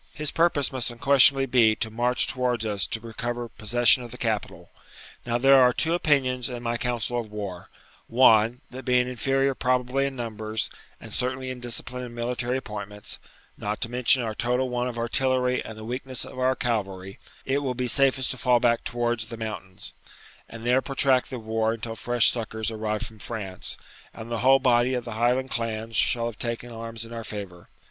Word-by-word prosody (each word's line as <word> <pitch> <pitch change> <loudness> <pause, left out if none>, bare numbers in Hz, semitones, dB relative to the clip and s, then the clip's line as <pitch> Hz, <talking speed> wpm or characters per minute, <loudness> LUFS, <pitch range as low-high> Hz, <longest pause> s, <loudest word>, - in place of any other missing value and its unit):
His 150 -1 -2
purpose 165 -5 +2
must 130 -3 -2
unquestionably 135 +2 +5
be 120 -4 +4
to 110 - -3
march 120 +2 +2
towards 125 -3 -1
us 105 -2 0
to 115 - -3
recover 120 +1 -4
possession 120 +2 +4
of 120 - -8
the 125 - -8
capital. 110 -4 -3 0.6
Now 120 0 +1
there 135 +2 +6
are 125 -1 +6
two 160 +6 0
opinions 130 -7 +1
in 120 -1 -6
my 120 0 -1
council 120 0 -1
of 110 -3 -7
war: 100 -4 -6 0.4
one, 115 0 +4
that 130 +1 -8
being 125 -1 +2
inferior 135 +2 +1
probably 125 +2 0
in 135 - -6
numbers, 110 -3 -4 0.3
and - - -8
certainly 130 +1 -1
in 125 - -7
discipline 120 +1 -3
and 120 -1 -8
military 120 +1 -2
appointments, 105 -4 -6 0.4
not 105 +1 -3
to 115 - -1
mention 125 +1 +4
our 110 -1 -3
total 125 +3 0
want 125 0 -1
of 120 - -7
artillery 125 +1 +1
and 110 - -9
the 110 - -9
weakness 130 +1 -3
of - - -9
our 130 0 +2
cavalry, 95 -6 -3 0.3
it 135 +1 +1
will 130 -3 -2
be 125 0 -1
safest 135 0 +3
to 130 - -5
fall 120 +2 +3
back 115 -1 +2
towards 120 -1 -1
the 115 0 -7
mountains, 105 -4 -6 0.6
and 115 0 -9
there 125 +2 +3
protract 135 -2 +2
the 130 - -5
war 110 0 -1
until 115 0 -5
fresh 120 0 +3
succours 110 -1 -3
arrive 110 -1 -2
from 110 -1 -10
France, 100 -5 -5 0.4
and 115 +1 -8
the 115 - -1
whole 135 +3 +6
body 125 -1 +3
of 125 - -3
the 120 - -6
Highland 125 +3 +1
clans 115 -1 -3
shall 115 +1 +2
have 115 -2 -5
taken 120 0 -3
arms 115 0 -6
in 115 - -10
our 115 -1 -5
favour. 100 -5 -8
120 Hz, 190 wpm, -26 LUFS, 110-130 Hz, 0.6 s, there